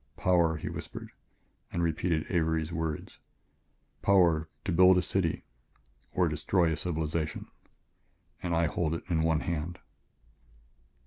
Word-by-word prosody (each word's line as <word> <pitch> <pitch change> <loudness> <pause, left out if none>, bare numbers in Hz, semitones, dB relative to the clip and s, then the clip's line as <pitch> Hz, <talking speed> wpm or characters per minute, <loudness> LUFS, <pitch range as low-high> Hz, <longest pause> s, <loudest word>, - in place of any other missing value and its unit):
"Power," 85 -3 +3
he - - -6
whispered - - -7 0.6
and 85 - -1
repeated 80 0 0
Avery's 80 -2 0
words; 80 -2 -4 0.8
"power, 85 -5 +4
to 100 - -2
build 90 +2 +6
a - - +4
city 90 -4 0 0.7
or 90 -1 +2
destroy 80 +2 +1
a - - 0
civilization... 80 -2 -2 1.0
and 85 -2 -1
I 85 0 +3
hold 80 +1 0
it - - -6
in 80 -2 +2
one 80 -1 +2
hand." 85 +1 -3
80 Hz, 125 wpm, -30 LUFS, 80-90 Hz, 1.0 s, build